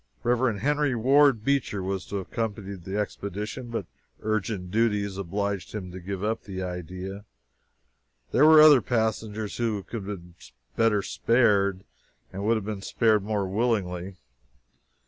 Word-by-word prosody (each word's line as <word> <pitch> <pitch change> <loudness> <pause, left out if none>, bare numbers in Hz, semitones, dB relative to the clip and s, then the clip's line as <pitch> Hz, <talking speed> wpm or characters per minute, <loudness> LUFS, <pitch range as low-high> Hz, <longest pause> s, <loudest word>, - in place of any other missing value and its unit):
Reverend 120 -3 +1
Henry 145 0 +1
Ward 135 0 +4
Beecher 125 -7 0
was 95 0 -3
to - - -6
have 95 -2 -5
accompanied 100 -5 -4
the 95 +2 -3
expedition, 105 +4 -4
but 115 - -3 0.4
urgent 105 -4 -2
duties 105 -3 +1
obliged 100 +1 -3
him 90 -4 -5
to 95 - -8
give 95 +2 -5
up 110 +1 -1
the 95 -2 -6
idea. 90 +2 -6 1.1
There 145 +5 +5
were 155 0 +8
other 150 -4 +8
passengers 110 -2 -2
who 110 -4 -1
could 105 -2 -6
have 90 -4 -7 0.4
been 110 -3 +3
spared 100 -5 +2
better - - -28 0.5
and 95 +1 -5
would 115 +2 +3
have 105 - -5
been 105 -2 -4
spared 110 +1 +2
more 100 -1 -1
willingly. 95 -4 -1
105 Hz, 145 wpm, -26 LUFS, 95-115 Hz, 1.1 s, were